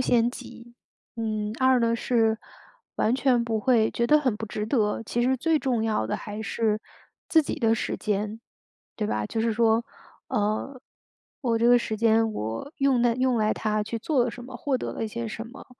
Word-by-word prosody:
先 240 -2 +3
级。 240 -1 -11 0.4
嗯， 215 -2 -2
二 260 -1 +4
呢 230 0 +2
是， 225 -2 +1 0.6
完 225 +3 +2
全 255 -3 +2
不 225 -2 -1
会， 225 -2 +3
觉 235 - 0
得 300 +4 +6
很 255 -7 0
不 220 - -5
值 210 0 -3
得， 215 -2 0
其 240 +2 -1
实 260 +2 +2
最 315 +4 +2
重 245 -5 0
要 215 - 0
的 - - -2
还 210 0 -7
是 220 -1 0 0.5
自 320 -3 +5
己 - - -4
的 225 -1 +3
时 - - -2
间。 210 +1 -2 0.6
对 210 - -1
吧？ 105 0 -1
就 225 - -3
是 230 - +1
说， 225 0 +3 0.5
呃， 215 +6 -1 0.6
我 235 -3 +1
这 235 - +3
个 245 0 +7
时 220 -2 -3
间 225 0 +3
我 110 - -4
用 270 -3 +2
在 240 -1 +3
用 255 0 +1
来 215 0 +2
它 215 -1 -1
去 230 +2 -4
做 260 +2 +1
了 245 - -1
什 245 +1 -10
么， 260 - -11
获 275 -3 0
得 - - -4
了 - - -5
一 - - -3
些 235 +2 -4
什 225 +1 -6
么。 245 +4 -12
230 Hz, 220 characters per minute, -26 LUFS, 215-245 Hz, 0.6 s, 个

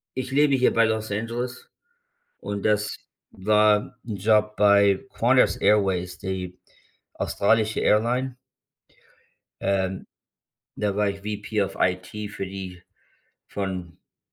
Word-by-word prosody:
ich 130 0 -4
lebe 145 0 +4
hier 130 - +3
bei 115 - +4
Los 110 -1 -2
Angeles 120 +4 -4 0.7
und 100 -1 -5
das 105 -1 +1 0.4
war 105 +4 +2
'n 110 -4 -4
Job 105 +1 +2
bei 100 -1 +4 0.2
Qantas - - +4
Airways, 95 -4 +1
die 90 -1 -5 0.6
australische 110 +1 +1
Airline. 125 +4 +1 1.3
Ähm, 95 -1 -1 0.7
da 105 -2 -1
war 105 -1 +2
ich 100 - -6
VP 105 0 -3
of 95 - -2
IT 90 0 +1 0.2
für 95 - -5
die 95 -1 -8 0.7
von, 95 -3 -4
äh, - - -38
105 Hz, 115 wpm, -24 LUFS, 95-110 Hz, 1.3 s, lebe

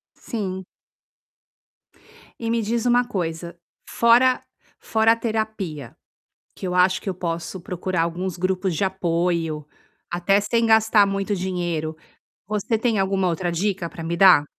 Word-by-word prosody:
Sim. 190 -5 -5 1.7
E 230 - -3
me 230 -1 +1
diz 230 +2 -1
uma 245 0 +4
coisa, 170 -6 -4 0.3
fora 245 +2 +4 0.4
fora 220 0 +2
a - - 0
terapia, 215 - -3 0.6
que - - -5
eu 180 - -2
acho 180 +1 +3
que - - -5
eu - - -4
posso 170 +1 -4
procurar 180 -2 -2
alguns 175 +2 -3
grupos 185 0 0
de 160 - -2
apoio, 170 -4 -1 0.4
até 180 +3 +2
sem 230 +3 +1
gastar 220 -2 +5
muito 195 +1 -1
dinheiro, 175 -4 -2 0.5
você 215 +2 0
tem 225 -2 +1
alguma 190 -1 +1
outra 175 +1 -1
dica 185 -1 -1
para 165 - -8
me 170 +1 -2
dar? 180 -5 +7
190 Hz, 140 wpm, -23 LUFS, 175-220 Hz, 1.7 s, dar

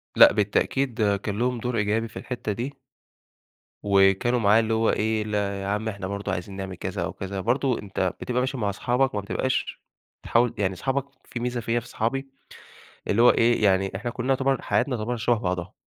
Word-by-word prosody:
لأ - - +8
بالتأكيد 110 +1 +1
كان 100 +1 -4
لهم 125 0 +1
دور 120 0 -2
إيجابي 110 +2 0
في 110 - -12
الحتّة 120 -4 -4
دي 120 +7 -4 1.1
وكانوا 100 +5 +3
معاه 105 0 +5
اللي 115 0 0
هو 110 0 +2
إيه 110 0 +1
يا - - -1
لا 100 -2 -2
عم 105 +2 -1
إحنا 100 -2 -5
برضو 100 0 -3
عايزين 95 +1 -4
نعمل 95 -1 -5
كذا - - -4
أو - - -4
كذا، 95 0 -5
برضو 125 +4 +1
أنت 95 -3 -2
بتبقى 125 0 -1
ماشي 130 +2 -1
مع 105 -4 0
صحابك، 125 +5 0
ما 105 - -1
بتبقاش 130 +6 -2 0.4
تحاول 120 0 +2
يعني 95 -2 0
صحابك 135 +7 -1 0.2
في 120 - -6
ميزة 120 0 -2
فيّا 115 +1 0
في 120 - -12
صحابي 135 +4 -2 0.8
اللي 105 - +2
هو 120 - +8
إيه، 115 -1 +2
يعني 95 -1 +3
إحنا 120 +5 -3
كلّنا 125 +2 -4
يُعتبر 135 -1 +1
حياتنا 120 +5 0
تُعتبر 120 +3 -2
شبه 120 +1 +2
بعضها، 90 0 -3
110 Hz, 195 wpm, -25 LUFS, 100-125 Hz, 1.1 s, لأ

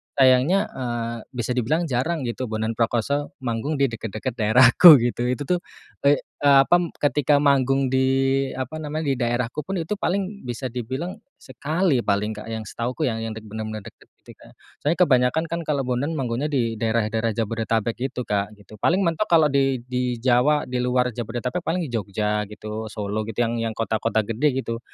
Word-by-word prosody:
sayangnya, 135 +10 +4
eee, 120 -2 -4 0.2
bisa 120 0 -2
dibilang 130 +7 0
jarang 145 +5 -1
gitu 125 +1 -3
Bondan 110 0 -2
Prakoso 130 +8 -1
manggung 120 +5 -2
di 140 -3 +1
deket-deket 110 +2 -4
daerahku 125 +9 +8
gitu, 120 0 -1
itu 125 +3 -1
tuh, 180 +5 0 0.5
eee 145 - +6 0.2
eee, 140 -1 +5
apam, 175 +3 +3
ketika 145 0 +2
manggung 135 -1 +2
di 130 0 +2 0.5
apa 130 +4 -5
namanya, 155 +1 -4
di 130 - -2
daerahku 120 +3 -1
pun 195 - -3
itu 185 +4 -3
paling 200 -3 -2
bisa 125 +1 -4
dibilang 130 - -5 0.2
sekali 150 +2 -1
paling 105 0 0
Kak, 105 0 -8
yang 110 -1 -4
setahuku 120 +8 -4
yah 115 - -4
yang 115 -1 -4
dek 110 - -9
bener-bener 110 0 -6
deket - - -15 0.2
gitu, - - -13
Kak. - - -17 0.2
Soalnya 160 +5 0
kebanyakan 130 +1 +2
kan 170 - -1
kalau 140 -3 0
Bondan 130 +6 -2
manggungnya 130 0 -2
di 120 -7 -1
daerah-daerah 110 0 0
Jabodetabek 115 0 -1
gitu 125 -1 -5
kak, 105 -1 -2
gitu. 105 +1 -16
Paling 185 - +2
mentok 170 +4 0
kalau 160 -4 +4
di 135 -3 +1
di 125 0 -2
Jawa, 130 +4 +3
di 125 0 -3
luar 125 0 +1
Jabodetabek 120 +7 -3
paling 170 -5 -2
Jogja 105 -1 -1
gitu, 110 +1 -7
Solo 105 0 -4
gitu, 115 +2 -1
yang 115 0 -1
yang 115 -1 -2
kota-kota 110 0 0
gede 125 +6 0
gitu, 115 0 -4
125 Hz, 175 wpm, -23 LUFS, 115-145 Hz, 0.5 s, daerahku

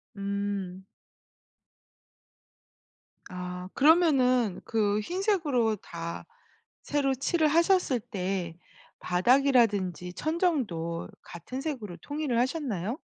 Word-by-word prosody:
음. 200 -2 -3 2.4
아 180 0 -6
그러면은 270 - +4
그 210 -2 +1
흰색으로 305 - 0
다 170 -2 -7 0.6
새로 280 -2 0
칠을 310 +5 +1
하셨을 335 -4 +3
때 190 -6 -3 0.4
바닥이라든지 200 -4 +2
천장도 250 - -1
같은 175 +11 -7
색으로 235 - -5
통일을 290 - -2
하셨나요? 250 - -2
230 Hz, 190 characters per minute, -28 LUFS, 185-290 Hz, 2.4 s, 그러면은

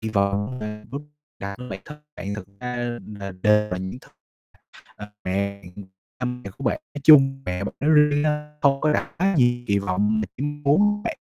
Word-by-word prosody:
kỳ 110 - -3
vọng 100 +3 0
mà 105 0 -6
b - - -10 0.4
đặt 100 0 -5
cho 125 - -7
bản 95 -1 -6
thân 150 0 -11 0.2
bạn 100 +1 -4
thực 100 -2 -8
ra 125 0 -4 0.4
là 100 -1 -5
đều 105 -1 +4
là 90 - -2
những 95 +6 -5
th - - -18 0.9
ờ, 105 0 -9
mẹ, 100 +1 -1
ừm, 90 +3 -10 0.4
ba 125 - -3
mẹ 125 -4 -4
của 135 - -6
bạn 310 - +1
nói 145 - -5
chung, 135 -3 +7
mẹ 90 +2 -2
bạn - - -4
nói 150 +2 +2
riêng 150 -1 +5
á, 150 0 -1
không 135 -1 +4
có 155 -1 +3
đặt - - -2
quá 195 +1 +2
nhiều 120 -1 +3
kỳ 100 -1 +3
vọng 100 +3 +1
để 110 +6 -4
muốn 145 +9 +2
bạn - - -3
120 Hz, 210 wpm, -24 LUFS, 100-145 Hz, 0.9 s, chung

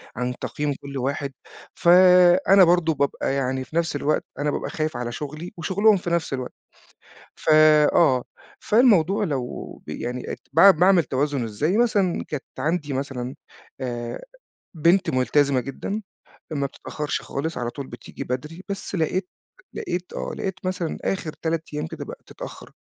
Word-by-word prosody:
عن 125 +1 -2
تقييم 145 -1 -2
كُل 140 -1 -7
واحد، 140 +2 -2 0.4
فأنا 180 +2 +6
برضه 170 -2 +4
بابقى 140 -1 -1
يعني 130 -1 -1
في 155 - -13
نفس 170 -2 0
الوقت 145 +1 0
أنا 145 0 0
بابقى - - -3
خايِف 155 -3 -2
على 120 -1 -3
شُغلي 150 +6 -6
وشُغلهم 200 +5 +3
في 175 - -4
نفس 170 -4 -1
الوقت، 130 -2 -4 0.8
ف - - -4 0.4
آه، 130 -7 +4 0.4
فالموضوع 210 -4 +4
لو 135 -9 -4
ب - - -8
يعني 125 +1 -4 0.2
باع 195 +5 +9
باعمل 180 0 +4
توازن 140 -1 -1
إزاي 145 - 0
مثلًا. 205 -7 +2
كانت 150 -3 -4 0.2
عندي 150 0 -1
مثلًا 130 -1 -4 0.5
آآ، 120 -2 -4 0.5
بنت 170 +3 +3
مُلتزِمة 130 +1 +2
جدًا، 195 - -5 0.5
ما 140 -3 -1
بتتأخرِش 150 +2 -5
خالص، 160 +4 -4
على 120 -1 -2
طول 140 +1 -7
بتيجي 120 - -9
بدري، 150 +8 -5
بس 200 0 -5
لقيت 180 +2 0 0.5
لقيت 175 +1 -4
آه، - - -4
لقيت 190 - -3
مثلًا 185 -3 -2
آخر 175 -5 -2
3 165 -1 0
أيام 150 +1 -2
كده 155 -2 -7
بقِت - - -10
تتأخر. - - -10
155 Hz, 150 wpm, -24 LUFS, 135-180 Hz, 0.8 s, باع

